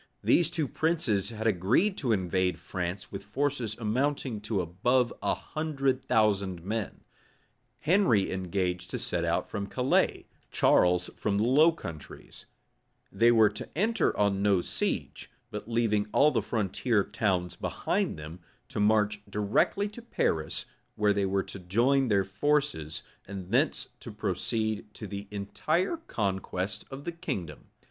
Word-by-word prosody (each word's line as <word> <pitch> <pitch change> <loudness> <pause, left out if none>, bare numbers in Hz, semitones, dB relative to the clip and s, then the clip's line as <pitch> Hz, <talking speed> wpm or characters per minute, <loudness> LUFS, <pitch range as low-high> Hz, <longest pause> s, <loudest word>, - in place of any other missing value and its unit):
These 170 -2 +4
two 160 -4 -1
princes 130 - 0
had 110 -1 -6
agreed 115 - +2
to 125 -4 0
invade 95 -2 +1
France 90 0 -5
with 100 - -5
forces 125 -1 -2
amounting 125 0 -1
to 110 -1 -1
above 115 +9 +1
a - - +1
hundred 140 -4 -1
thousand 100 -5 +2
men: 105 +2 -3 0.8
Henry 160 - +3
engaged 90 -1 -2
to - - -3
set 85 -1 -1
out 85 0 0
from 100 -2 -4
Calais; 125 +5 +1 0.2
Charles 90 0 +3
from 100 -2 -1
the 110 +3 +2
Low 150 +6 +6
Countries: 85 - -9 0.6
they 120 +1 +4
were 110 -3 +5
to 105 - -8
enter 225 +5 +1
on 100 -1 +2
no 100 -2 +4
siege; - - -3 0.2
but 105 +1 -6
leaving 110 -3 +1
all 145 +5 +5
the - - +1
frontier 110 0 0
towns 90 -5 -1
behind - - -1
them, 75 +3 -8 0.3
to - - -4
march 105 0 +3
directly 105 - +1
to 210 +3 -10
Paris, 85 - -1 0.3
where 105 -1 +3
they 100 -1 +1
were 95 0 +1
to 95 - -8
join 120 +9 +2
their 100 -3 +3
forces, 95 - 0 0.2
and 95 -2 -7
thence 135 +7 +1
to - - -9
proceed 105 +1 -2
to 110 - -7
the 100 0 -6
entire 155 - -1
conquest 95 - -3
of 135 +1 -8
the 175 - -2
kingdom. 95 - -5
105 Hz, 145 wpm, -29 LUFS, 95-130 Hz, 0.8 s, Low